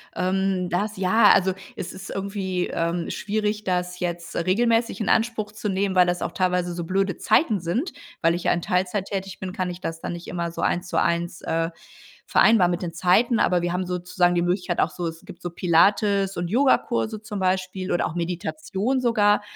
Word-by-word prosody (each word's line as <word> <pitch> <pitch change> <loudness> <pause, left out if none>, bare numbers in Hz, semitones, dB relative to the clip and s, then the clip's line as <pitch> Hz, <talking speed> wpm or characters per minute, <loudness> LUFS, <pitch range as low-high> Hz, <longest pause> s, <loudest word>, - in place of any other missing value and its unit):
Ähm, 185 0 0
das 205 +3 -1
ja, 195 +5 +3
also, 190 0 +3 0.2
es 195 -6 -6
ist 190 - -9
irgendwie, 195 -2 -2
ähm, 170 +1 -1
schwierig 210 0 -2
das 180 -1 -1
jetzt 175 -1 -4
regelmäßig 230 +7 +1
in 215 - -1
Anspruch 225 -2 +1
zu 215 0 -4
nehmen, 195 0 0
weil 180 -1 +5
das 175 0 -1
auch - - -2
teilweise 180 -2 0
so 170 -1 -4
blöde 190 0 0
Zeiten 220 - +2
sind. 230 - -2 0.3
Weil 165 0 +4
ich 175 - -4
ja - - +4
in 175 - 0
Teilzeit 185 +2 0
tätig 195 -1 -5
bin, 185 -1 -5
kann 185 -1 -2
ich 175 0 -6
das 165 -2 -5
dann - - -4
nicht 170 0 -8
immer 170 -1 -3
so - - -6
1 175 +1 0
zu - - -2
1, 170 0 -1
äh, 165 0 -1 0.6
vereinbaren 210 -6 +5
mit 175 - -2
den 170 - -4
Zeiten. 190 +8 +3
Aber 180 -1 +3
wir 175 0 -1
haben 180 0 -1
sozusagen 180 0 +1
die 170 - +2
Möglichkeit 180 0 -1
auch - - +2
so 175 -2 -4
es 165 +1 -7
gibt 190 -3 -12
so 175 - -4
Pilates 195 +3 +2
und 175 0 -2
Yogakurse 235 -2 +1
zum 210 -2 -6
Beispiel 185 0 -1
oder 175 - +1
auch - - -7
Meditation 200 - -2
sogar. 210 -4 +3
185 Hz, 200 wpm, -24 LUFS, 175-205 Hz, 0.6 s, weil